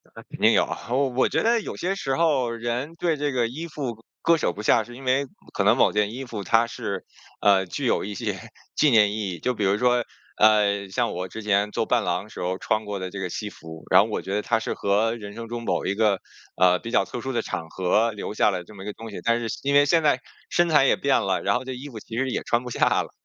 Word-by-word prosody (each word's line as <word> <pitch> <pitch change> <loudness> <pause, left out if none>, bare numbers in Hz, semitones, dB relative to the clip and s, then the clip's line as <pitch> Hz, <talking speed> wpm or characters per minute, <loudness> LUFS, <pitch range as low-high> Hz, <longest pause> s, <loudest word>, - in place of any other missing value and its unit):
那 - - -10
肯 - - -11
定 - - +5
有 - - +4
啊， - - -7
我 135 +2 +2
我 130 +1 +1
觉 - - 0
得 230 +1 +3
有 - - -6
些 190 +3 -2
时 135 -8 -2
候 140 -6 +2
人 120 +7 -3
对 165 -1 0
这 145 0 -1
个 120 -2 +1
衣 155 +8 -6
服 125 -8 -5 0.2
割 170 0 +4
舍 - - 0
不 105 - -7
下， 110 - +4
是 120 +2 -12
因 135 - -11
为 130 +2 +2 0.3
可 100 - 0
能 110 +4 +4
某 - - +4
件 105 0 0
衣 135 +2 -6
服 110 -5 -6
它 115 +5 +3
是， 100 -4 -5 0.4
呃， 95 -2 +4
具 90 - -4
有 - - +1
一 105 - -5
些 - - -3 0.4
纪 150 - +4
念 105 -3 +5
意 105 -2 -2
义， 85 - -7
就 125 +9 0
比 110 - -3
如 100 +1 +2
说， 125 +1 +2 0.3
呃， 100 -2 +3
像 120 +4 0
我 90 +1 -4
之 110 - -8
前 105 0 +2
做 110 - -1
伴 120 -1 +1
郎 90 +3 -2
时 - - -10
候 90 +1 -1
穿 110 +2 -1
过 105 -1 -4
的 95 - -4
这 100 - -6
个 95 -1 -3
西 105 +4 -4
服， 80 -2 -11
然 95 +1 +8
后 105 - 0
我 - - -2
觉 95 - -5
得 105 - +1
它 115 +1 +1
是 115 - -3
和 105 +3 +1
人 105 -3 -8
生 115 +2 -7
中 120 0 -5
某 - - -1
一 95 - 0
个， 105 -3 +2 0.4
呃， 90 0 +4
比 115 - -7
较 - - +3
特 120 - -6
殊 135 - -3
的 120 - +1
场 80 -1 -5
合 100 +7 +1
留 105 -1 -6
下 105 - +3
了 90 -2 -3
这 95 - -15
么 95 - -9
一 - - -9
个 105 - -4
东 115 -1 -9
西， - - -7
但 115 0 +2
是 115 - -3 0.2
因 140 +1 +1
为 145 0 +7
现 165 +3 +3
在 150 - +3 0.3
身 175 0 +2
材 150 -4 +5
也 - - +4
变 140 -1 +2
了， 95 -1 0
然 - - +1
后 125 - -1
这 130 - -4
衣 135 +4 -8
服 115 -5 -8
其 115 +2 -8
实 130 +1 0
也 - - -1
穿 120 +1 0
不 125 - -7
下 - - +2 0.2
了， - - -11
115 Hz, 305 characters per minute, -24 LUFS, 100-130 Hz, 0.4 s, 然